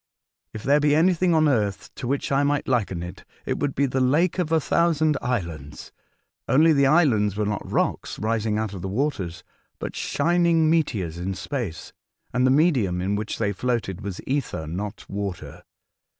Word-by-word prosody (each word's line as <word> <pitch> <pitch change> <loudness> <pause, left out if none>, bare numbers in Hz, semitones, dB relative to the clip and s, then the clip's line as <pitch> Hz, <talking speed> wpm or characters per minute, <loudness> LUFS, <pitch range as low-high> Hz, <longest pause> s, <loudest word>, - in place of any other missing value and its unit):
If 110 - -8
there 145 +3 +4
be 145 0 +3
anything 175 +1 +3
on 155 -1 +4
earth 105 -8 -1
to 125 - -6
which 140 +2 -1
I 135 0 +3
might 145 0 0
liken 100 -9 0
it, 90 - -9 0.2
it - - -2
would 145 -2 -1
be 140 - +2
the 130 0 -1
Lake 160 +8 +2
of 165 -3 -1
a 160 - +4
Thousand 155 -1 +2
Islands, 85 - -4 0.6
only 160 +4 +5
the 140 -2 +4
islands 125 - +3
were 105 - 0
not 105 -1 -3
rocks - - -1
rising 110 0 0
out 110 -2 -2
of 95 - -7
the 95 - -4
waters, 95 - -2 0.3
but - - -6
shining 165 0 +2
meteors 100 - 0
in 95 +2 -3
space, 100 - -5 0.4
and 125 +1 +3
the - - +4
medium 130 - +2
in 95 +3 -1
which 105 +1 -3
they 105 -2 0
floated 110 -4 -2
was 100 -3 -5
ether, 135 - -2
not 100 +7 -6
water. 100 -2 -5
125 Hz, 180 wpm, -24 LUFS, 100-150 Hz, 0.6 s, only